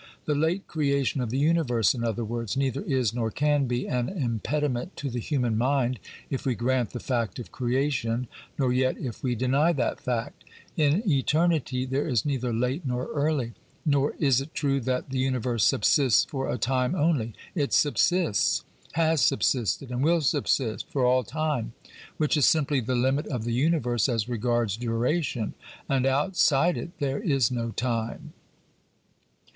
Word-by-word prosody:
The 150 - +1
late 160 +6 0
creation 140 -3 0
of 120 - -2
the 130 - -2
universe, 140 -7 +2
in 120 -3 -4
other 115 0 -1
words, 115 +1 -3
neither 135 - 0
is 130 - 0
nor 115 -2 -1
can 145 +3 +1
be 120 +1 -2
an 125 -1 -1
impediment 140 - -2
to 140 -2 -4
the 120 - -3
human 125 -3 -1
mind 125 0 +1 0.3
if 135 - -2
we 130 -3 0
grant 125 0 0
the 120 - -6
fact 120 -7 -2
of 120 - -8
creation, 125 -2 -1 0.3
nor 130 -3 +1
yet 130 0 +1
if 120 -5 -6
we 125 -2 0
deny 135 +8 +2
that 130 -6 -1
fact. 120 -2 -3 0.3
In 160 +8 +2
eternity 150 -3 +1
there 135 +4 -1
is 120 -8 +1
neither 130 -4 -1
late 125 +8 -1
nor 125 -2 -3
early. 145 -5 0 0.3
Nor 140 -1 +2
is 135 -4 +3
it 145 +3 -9
true 140 -2 +1
that 130 +1 -2
the 130 - -1
universe 125 -3 0
subsists 130 +2 +4
for 135 -2 -3
a - - -1
time 125 - 0
only; 145 - 0 0.2
it 145 -6 -1
subsists, 150 - +2 0.3
has 160 -2 +2
sub 135 - +2
sisted 125 +1 0
and 125 +2 -1
will 165 +2 +3
subsist 125 -3 0
for 135 -3 0
all 125 +1 +3
time, 150 -4 -2 0.4
which 155 0 +1
is 150 - +4
simply 145 -3 +2
the 125 +1 -1
limit 130 +4 +1
of 125 -6 -3
the 120 0 -2
universe 125 -4 +1
as 115 -3 0
regards 120 -3 0
duration, 120 +1 -1 0.3
and 135 -1 +1
outside 150 +2 +2
it - - -5
there 140 -1 -1
is 140 - +1
no 115 -2 -2
time. 115 -1 -3
130 Hz, 170 wpm, -26 LUFS, 120-145 Hz, 0.4 s, subsists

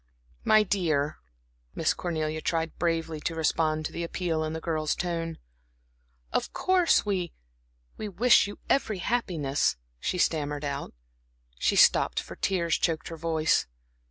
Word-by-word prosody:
"My 215 0 +5
dear," 155 -7 0 0.6
Miss - - +2
Cornelia 155 -2 -2
tried 165 0 -1
bravely 165 -2 -1
to 165 +2 -3
respond 155 -1 +1
to - - -3
the 170 - -4
appeal 170 -2 -1
in 155 0 -3
the 160 - -3
girl's 155 -2 -1
tone. 165 -2 -3 1.0
"Of - - -1
course, 370 -8 +3
we 185 -4 -1 0.6
we 215 - -4
wish 235 +3 +5
you 205 - -8
every 220 -7 +1
happiness," 175 - 0 0.2
she 180 - -2
stammered 150 -3 0
out. 140 - -4 0.6
She - - +2
stopped, - - +5
for - - -8
tears 170 -4 0
choked 160 -4 -1
her 165 - -6
voice. 160 -1 +1
165 Hz, 140 wpm, -28 LUFS, 155-180 Hz, 1.0 s, My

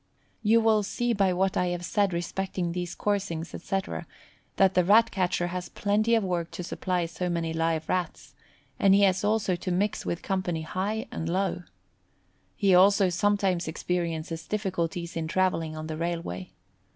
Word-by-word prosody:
You 225 +1 +4
will 220 -1 +4
see 240 +4 -1
by 195 -3 +2
what 190 +1 +1
I 180 - +1
have 175 0 -3
said 200 +1 +1
respecting 175 +1 -2
these 175 0 -4
coursings, 190 -5 -2
etc., 195 +2 -3 0.5
that 195 -1 +4
the 180 - +4
Rat 225 +5 +5
catcher 180 -2 0
has 180 0 -5
plenty 215 +3 +1
of 225 - +2
work 175 -3 -1
to 180 - -5
supply 180 0 -1
so 180 +2 -3
many 165 -1 -1
live 165 -1 0
rats, 180 -3 -3 0.5
and 195 -1 +5
he 200 - +5
has 190 -1 +3
also 205 -3 +1
to 175 - -5
mix 200 +4 0
with 170 - -3
company 180 -4 -1
high 200 +7 -2
and 160 - -3
low. 190 0 0 0.9
He 195 -2 +3
also 195 +1 +6
sometimes 190 -1 +1
experiences 165 -1 -3
difficulties 175 -5 -2
in 165 -1 -2
travelling 165 -3 0
on 155 - -5
the 155 0 -5
railway. 165 - -4
180 Hz, 165 wpm, -27 LUFS, 170-200 Hz, 0.9 s, also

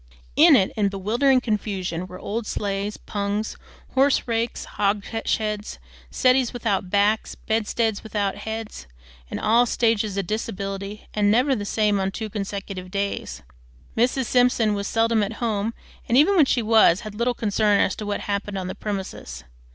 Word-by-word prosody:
In - - +8
it, 190 - +3
in 210 -2 +2
bewildering 235 +7 +2
confusion, 195 -6 -2
were 180 0 -9
old 215 +4 -4
sleighs, 200 0 -2
pungs, 205 +1 -3 0.4
horse 270 0 +3
rakes, 230 0 -1
hogsheads, 210 +1 -2 0.3
settees 255 -1 +2
without 205 -6 -1
backs, 205 +2 +1
bed 220 -1 -1
steads 225 -3 0
without 205 -3 -2
heads, 220 - -6 0.4
in - - -4
all 235 +3 +3
stages 220 -4 +1
of 195 - -1
disability, 200 -1 -4
and 205 -1 +2
never 255 +6 +3
the 205 -3 -4
same 210 -1 +1
on 190 0 0
two 215 +2 -5
consecutive 195 -2 -5
days. 200 - -3 0.5
Mrs. 255 +3 +1
Simpson 245 -3 +3
was 200 0 -2
seldom 225 -1 +2
at 205 +2 -1
home, 220 -2 -1 0.4
and 235 - +4
even 320 +8 +5
when 320 -6 +6
she 245 -3 +1
was, 220 -5 +5
had 215 -3 -7
little 235 +3 0
concern 210 -2 +2
as 185 - +2
to - - -5
what 205 -1 -2
happened 200 0 -3
on 185 - -3
the 185 - -4
premises. 190 - -6
210 Hz, 160 wpm, -23 LUFS, 200-230 Hz, 0.5 s, In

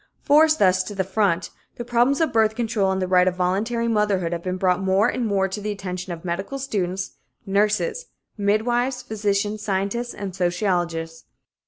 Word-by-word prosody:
Forced 310 +2 +5
thus 185 -2 +4
to 205 - -7
the 190 - 0
front, 190 -3 0 0.2
the 240 - -6
problems 245 +5 +2
of 320 -4 +1
birth 220 -1 +3
control 220 -5 0
and 190 - -1
the 185 - -1
right 180 0 +4
of 180 - +1
voluntary 210 +6 0
motherhood 205 -6 +1
have 170 - -3
been 185 +1 -3
brought 185 0 +1
more 190 +3 +3
and 245 -1 -1
more 195 -2 +1
to 195 +2 -5
the 210 - -3
attention 185 -2 -5
of 170 0 -7
medical 195 +10 -3
students, 195 -8 -2 0.3
nurses, 210 - 0 0.3
midwives, 240 +5 0
physicians, 210 0 -1
scientists 200 +4 -2
and 195 -3 -6
sociologists. 175 -3 -1
200 Hz, 175 wpm, -23 LUFS, 185-225 Hz, 0.3 s, Forced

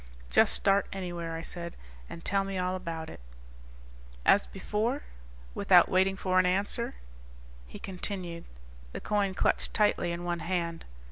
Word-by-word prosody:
"Just - - +5
start 195 0 +3
anywhere," 175 -3 -4
I 165 - -5
said, 170 0 -6 0.3
"and 170 - -9
tell 195 0 +2
me 195 -1 -4
all 185 0 0
about 165 -3 -5
it." - - -9 1.1
"As 200 - +5
before?" 220 +8 -2 0.5
Without - - +5
waiting 190 +1 +3
for 185 -1 +2
an 185 - +4
answer, 200 +6 0 0.7
he - - -9
continued, 180 -3 -5 0.5
the - - -4
coin 200 -2 0
clutched - - 0
tightly 210 -5 +2
in 170 +1 -4
one 175 -1 -1
hand. 170 -2 -2
185 Hz, 145 wpm, -30 LUFS, 170-195 Hz, 1.1 s, Just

